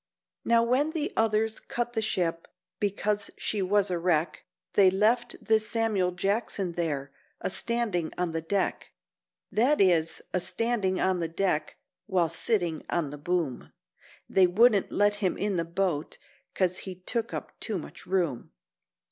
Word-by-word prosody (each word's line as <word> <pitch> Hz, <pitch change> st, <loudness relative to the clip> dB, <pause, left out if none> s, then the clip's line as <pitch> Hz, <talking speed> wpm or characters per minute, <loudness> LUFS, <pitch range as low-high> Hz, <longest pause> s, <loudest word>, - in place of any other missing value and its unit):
Now 230 Hz, 0 st, +4 dB
when 270 Hz, +6 st, +1 dB
the 320 Hz, +3 st, -2 dB
others 220 Hz, 0 st, +1 dB
cut 240 Hz, 0 st, -3 dB
the 225 Hz, -, 0 dB
ship, 170 Hz, -6 st, -1 dB, 0.3 s
because 205 Hz, 0 st, -1 dB
she 210 Hz, -, -1 dB
was 200 Hz, +1 st, +2 dB
a 175 Hz, -, 0 dB
wreck, 170 Hz, -2 st, 0 dB, 0.3 s
They 195 Hz, -2 st, +6 dB
left 215 Hz, +6 st, +2 dB
this 220 Hz, -1 st, +2 dB
Samuel 220 Hz, -5 st, +1 dB
Jackson 195 Hz, 0 st, -1 dB
there, 150 Hz, -5 st, -2 dB, 0.3 s
a -, -, -3 dB
standin' 215 Hz, -8 st, -1 dB
on 180 Hz, -2 st, 0 dB
the 165 Hz, 0 st, -2 dB
deck— 190 Hz, +4 st, -2 dB, 0.6 s
That 260 Hz, +7 st, +3 dB
is, 170 Hz, -4 st, +2 dB
a 185 Hz, -, +2 dB
standin' 190 Hz, +1 st, 0 dB
on 185 Hz, -1 st, +1 dB
the 165 Hz, -, -1 dB
deck, 165 Hz, -2 st, -1 dB, 0.3 s
while 180 Hz, -5 st, +2 dB
sittin' 170 Hz, -2 st, 0 dB
on 160 Hz, -5 st, -1 dB
the 145 Hz, -, -8 dB
boom; 165 Hz, -4 st, -2 dB, 0.5 s
They 185 Hz, -1 st, +5 dB
wouldn't 205 Hz, +2 st, +4 dB
let 205 Hz, 0 st, +2 dB
him 195 Hz, -3 st, 0 dB
in 200 Hz, -2 st, -1 dB
the 165 Hz, -, 0 dB
boat 170 Hz, -3 st, -2 dB, 0.4 s
'cos 185 Hz, -1 st, +1 dB
he 190 Hz, -2 st, -7 dB
took 225 Hz, +6 st, -2 dB
up -, -, -7 dB
too 215 Hz, -4 st, -2 dB
much 160 Hz, -, -9 dB
room. 175 Hz, -9 st, -1 dB
190 Hz, 155 wpm, -28 LUFS, 175-220 Hz, 0.6 s, They